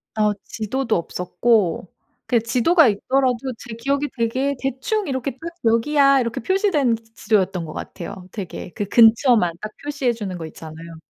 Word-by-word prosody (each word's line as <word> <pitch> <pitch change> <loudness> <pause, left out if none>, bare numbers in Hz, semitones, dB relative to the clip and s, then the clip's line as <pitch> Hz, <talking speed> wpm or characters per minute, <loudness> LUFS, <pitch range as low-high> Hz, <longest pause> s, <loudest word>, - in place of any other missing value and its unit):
어 210 -1 +2
지도도 230 +2 -2
없었고 180 +2 0 0.4
그냥 235 -2 +2
지도가 255 +8 +4
있더라도 255 +4 +1 0.2
제 235 -1 -9
기억에 280 +5 -1
되게 255 +5 0
대충 270 - -2
이렇게 265 0 -2
딱 260 - -20 0.3
'여기야.' 275 +5 +4
이렇게 235 -2 -2
표시된 320 - +2 0.2
지도였던 190 -5 0
것 155 - -8
같아요. 180 0 -8
되게 190 -3 -7
그 205 - -2
근처만 225 - +5
딱 215 0 -5
표시해 285 -4 -1
주는 200 -5 -5
거 165 - -6
있잖아요. 160 +1 -10
230 Hz, 335 characters per minute, -21 LUFS, 200-270 Hz, 0.4 s, 근처만